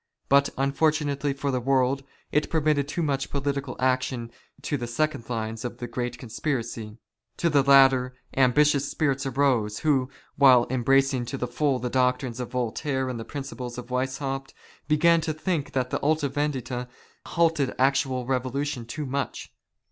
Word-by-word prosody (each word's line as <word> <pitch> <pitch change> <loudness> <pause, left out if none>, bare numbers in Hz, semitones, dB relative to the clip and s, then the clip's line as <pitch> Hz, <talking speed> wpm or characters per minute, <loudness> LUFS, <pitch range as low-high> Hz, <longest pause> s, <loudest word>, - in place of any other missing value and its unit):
But 140 +1 +5 0.2
fortunately 145 -2 +1
for 140 0 -2
the 130 - 0
world, 135 +1 +1 0.3
it 150 - +1
permitted 150 -3 +1
too 170 +3 -2
much 140 -3 -1
political 140 -1 -2
action 130 -2 0 0.3
to 145 - -1
the 120 -4 -3
second 120 -1 -1
lines 115 -1 -3
of 125 - -5
the 120 - -5
great 120 +1 -4
conspiracy. 115 -3 -4 0.5
In 170 - +3
the 145 -1 +5
latter, 135 -2 +5 0.2
ambitious 140 +2 +3
spirits 140 -3 0
arose, 125 -6 +1
who, 135 -5 +2 0.3
while 130 -4 +7
embracing 135 0 +2
to 135 - -5
the 125 - -2
full 130 +3 0
the 125 0 -4
doctrines 125 -1 +1
of 125 - -4
Voltaire 130 +2 -2
and 125 -2 -4
the - - -4
principles 130 -4 -6
of 125 0 -8
Weishaupt, 135 +1 -3 0.3
began 165 +2 +4
to 155 0 -2
think 155 -1 -2
that 130 -1 -1
the - - 0
Alta 150 -1 +1
Vendita 130 -3 -2 0.4
stayed 165 -5 +2
actual 130 -1 +1
revolution 130 0 -2
too 150 +5 -4
much. 140 - -4
135 Hz, 155 wpm, -26 LUFS, 125-145 Hz, 0.5 s, while